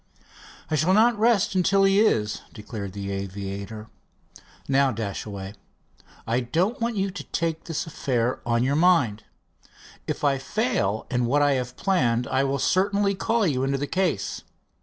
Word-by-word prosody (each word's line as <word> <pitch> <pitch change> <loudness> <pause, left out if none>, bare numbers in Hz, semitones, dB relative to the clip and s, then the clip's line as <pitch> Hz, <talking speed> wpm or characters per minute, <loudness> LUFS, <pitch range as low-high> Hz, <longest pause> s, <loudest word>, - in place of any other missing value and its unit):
"I - - 0
shall 165 +6 +3
not 225 0 +4
rest 220 -4 +3
until 195 +1 +3
he 195 +1 +4
is," 110 - +2
declared 105 -3 -7
the 100 0 -5
aviator. 100 +2 -5 0.8
"Now, 135 0 +3
Dashaway, 100 -2 -5 0.7
I 115 +2 +1
don't 170 - -1
want 230 0 0
you 195 -1 -1
to 195 - -7
take 165 -1 -2
this 165 -3 -3
affair 125 -6 -1
on 115 0 +1
your 135 +2 +1
mind. 150 - +3 0.8
If - - -3
I 140 -2 +2
fail 135 - -1
in 125 -1 +1
what 145 +4 +3
I 145 - +4
have 125 -2 -2
planned, 125 - +1
I 130 +1 +2
will 140 0 0
certainly 200 +6 +2
call 225 +3 0
you 135 -6 0
into 135 +1 0
the 140 - -2
case. 175 - -1
135 Hz, 160 wpm, -25 LUFS, 115-190 Hz, 0.8 s, not